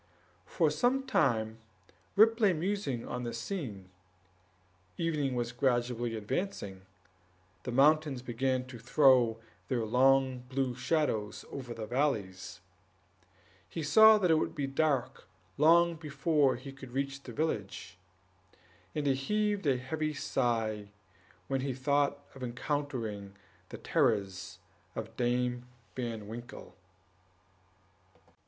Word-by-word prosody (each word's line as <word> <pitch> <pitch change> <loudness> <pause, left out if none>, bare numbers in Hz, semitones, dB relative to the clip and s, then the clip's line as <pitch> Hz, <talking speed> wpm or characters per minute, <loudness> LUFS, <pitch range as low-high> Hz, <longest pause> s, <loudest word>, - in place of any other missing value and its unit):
For - - +2
some 265 +2 +1
time 110 - +1 0.6
Rip 225 +3 +6
lay 205 -5 +4
musing 175 - -2
on 125 - -4
this 120 -1 -4
scene; 115 - -5 1.1
evening 150 -6 0
was 120 -1 -1
gradually 120 -2 0
advancing, 105 - -4 0.7
the 125 - -5
mountains 145 0 +3
began 130 +1 -1
to 130 -2 -10
throw 125 -2 +4 0.3
their 120 -4 0
long 130 +2 +3
blue 130 -1 -1
shadows 125 -5 -1
over 125 -4 -6
the 110 -1 -5
valleys; 105 -8 -2 1.1
he 165 - -4
saw 220 +9 +8
that 180 -5 +2
it 160 - +5
would - - -2
be 145 - -1
dark 135 -1 0 0.3
long 170 +2 +5
before 150 -2 +1
he 135 +3 -9
could 130 -2 -12
reach 135 0 -2
the - - -9
village, 100 - -3 1.0
and 150 -1 -1
he 140 - +4
heaved 205 +6 0
a 135 -2 +3
heavy 155 +4 -3
sigh 110 -6 -1 0.6
when 135 +4 -1
he 135 -1 -2
thought 140 +1 0
of 135 - -12
encountering 120 -6 -3 0.3
the - - -7
terrors 95 -2 0 0.4
of 110 +1 -6
Dame 125 0 0 0.3
Van 115 -4 -4
Winkle. 120 +2 -9
130 Hz, 120 wpm, -31 LUFS, 120-150 Hz, 1.1 s, saw